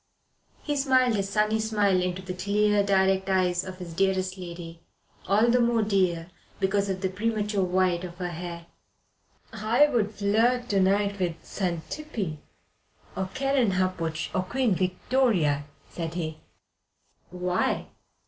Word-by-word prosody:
He 295 Hz, -, -1 dB
smiled 260 Hz, -3 st, +3 dB
his 195 Hz, -1 st, -1 dB
sunny 215 Hz, +2 st, +1 dB
smile 205 Hz, -4 st, +2 dB
into 180 Hz, +1 st, -2 dB
the 185 Hz, -1 st, -5 dB
clear, 205 Hz, +3 st, +2 dB
direct 190 Hz, -1 st, +2 dB
eyes 180 Hz, -1 st, +2 dB
of 185 Hz, -1 st, -8 dB
his 175 Hz, -2 st, -8 dB
dearest 190 Hz, +1 st, +1 dB
lady 170 Hz, -2 st, -8 dB, 0.5 s
all 210 Hz, +5 st, +4 dB
the 250 Hz, -, +4 dB
more 235 Hz, -2 st, +3 dB
dear 185 Hz, -4 st, 0 dB, 0.3 s
because 200 Hz, +1 st, +1 dB
of 190 Hz, -1 st, -2 dB
the 190 Hz, -, +1 dB
premature 210 Hz, 0 st, -1 dB
white 185 Hz, -1 st, +1 dB
of 175 Hz, -1 st, -7 dB
her 180 Hz, -1 st, -3 dB
hair. 170 Hz, 0 st, -6 dB, 0.9 s
"I 230 Hz, +7 st, +4 dB
would 230 Hz, -7 st, 0 dB
flirt 230 Hz, +5 st, +2 dB
to 200 Hz, -, +2 dB
night 200 Hz, +1 st, +2 dB
with 175 Hz, -3 st, 0 dB
Xantippe, 185 Hz, -, -4 dB, 0.8 s
or 190 Hz, -1 st, -2 dB
Kerenhappuch, 185 Hz, -, 0 dB
or 185 Hz, -, +1 dB
Queen 235 Hz, +4 st, 0 dB
Victoria," 185 Hz, -, +1 dB, 0.2 s
said 165 Hz, -1 st, -5 dB
he. 160 Hz, -3 st, -4 dB, 0.9 s
"Why?" 180 Hz, 0 st, -1 dB
190 Hz, 135 wpm, -27 LUFS, 180-215 Hz, 0.9 s, all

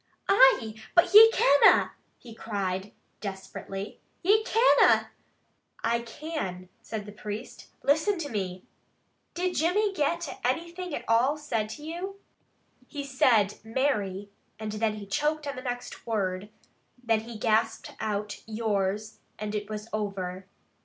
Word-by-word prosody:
"Aye, 245 Hz, -, +4 dB
but 345 Hz, +1 st, +4 dB
ye 445 Hz, +2 st, +10 dB
canna!" 285 Hz, -, +5 dB, 0.3 s
he 235 Hz, -2 st, -12 dB
cried 200 Hz, -3 st, -3 dB, 0.3 s
desperately. 195 Hz, 0 st, -7 dB, 0.2 s
"Ye 420 Hz, +4 st, +4 dB
canna!" 465 Hz, +2 st, +4 dB, 0.7 s
"I 235 Hz, +1 st, +2 dB
can," 235 Hz, -, -6 dB
said 215 Hz, -2 st, -6 dB
the 210 Hz, -, -9 dB
priest. 210 Hz, +1 st, -7 dB, 0.2 s
"Listen 315 Hz, +8 st, +2 dB
to 310 Hz, -4 st, -4 dB
me! 185 Hz, -4 st, -4 dB, 0.7 s
Did 360 Hz, +1 st, -1 dB
Jimmy 395 Hz, +6 st, +2 dB
get 335 Hz, 0 st, -1 dB
anything 340 Hz, +5 st, -2 dB
at -, -, -6 dB
all 245 Hz, +6 st, +3 dB
said 230 Hz, -8 st, -2 dB
to 295 Hz, -, -12 dB
you?" 360 Hz, +5 st, -6 dB, 0.7 s
"He 290 Hz, -2 st, -5 dB
said, 240 Hz, -7 st, +2 dB
'Mary,' 210 Hz, -5 st, -1 dB, 0.3 s
then 215 Hz, 0 st, -2 dB
he 210 Hz, -1 st, -8 dB
choked 300 Hz, +7 st, -1 dB
on 280 Hz, 0 st, -4 dB
the 255 Hz, -, -6 dB
next 245 Hz, -1 st, -6 dB
word, 200 Hz, -3 st, -2 dB, 0.5 s
then 225 Hz, -2 st, +2 dB
he 225 Hz, +1 st, -8 dB
gasped 225 Hz, +1 st, 0 dB
out 210 Hz, -1 st, -3 dB
'yours,' 215 Hz, -1 st, -2 dB, 0.2 s
and 210 Hz, 0 st, -4 dB
it 210 Hz, 0 st, -3 dB
was 215 Hz, 0 st, -5 dB
over." 195 Hz, -3 st, -4 dB
225 Hz, 130 wpm, -28 LUFS, 210-295 Hz, 0.7 s, ye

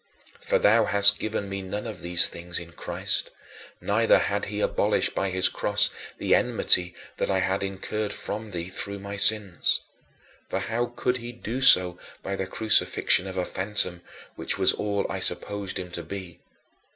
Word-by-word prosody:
For -, -, 0 dB
thou 110 Hz, +2 st, +3 dB
hadst 100 Hz, 0 st, +7 dB
forgiven 110 Hz, -2 st, -4 dB
me 100 Hz, 0 st, -5 dB
none 100 Hz, +3 st, -6 dB
of 110 Hz, -5 st, -8 dB
these 85 Hz, 0 st, +4 dB
things 90 Hz, +1 st, -6 dB
in 85 Hz, -1 st, -8 dB
Christ, -, -, -3 dB, 0.5 s
neither -, -, +2 dB
had -, -, -2 dB
he -, -, -5 dB
abolished -, -, 0 dB
by 100 Hz, -, -2 dB
his 95 Hz, 0 st, +3 dB
cross 105 Hz, 0 st, +2 dB, 0.3 s
the -, -, 0 dB
enmity 90 Hz, -1 st, +2 dB, 0.2 s
that -, -, -2 dB
I 95 Hz, -, +1 dB
had 95 Hz, +1 st, -1 dB
incurred 100 Hz, +2 st, -4 dB
from 110 Hz, +2 st, -5 dB
thee 85 Hz, -2 st, -6 dB
through 100 Hz, +1 st, -4 dB
my 100 Hz, 0 st, -8 dB
sins. 100 Hz, -3 st, +4 dB, 0.7 s
For -, -, -2 dB
how 120 Hz, +2 st, -2 dB
could 125 Hz, +1 st, -2 dB
he 120 Hz, 0 st, -8 dB
do 120 Hz, +1 st, -6 dB
so 90 Hz, -9 st, +6 dB, 0.2 s
by 100 Hz, -, -4 dB
the 95 Hz, -1 st, -4 dB
crucifixion 100 Hz, -2 st, +1 dB
of 95 Hz, 0 st, -7 dB
a 90 Hz, -, -1 dB
phantom, 95 Hz, -3 st, -2 dB, 0.3 s
which -, -, -4 dB
was -, -, +3 dB
all 100 Hz, -1 st, -3 dB
I 95 Hz, -, -5 dB
supposed 100 Hz, +1 st, -1 dB
him 90 Hz, -1 st, -7 dB
to 85 Hz, -, -5 dB
be? 95 Hz, -2 st, -9 dB
100 Hz, 175 wpm, -25 LUFS, 90-105 Hz, 0.7 s, hadst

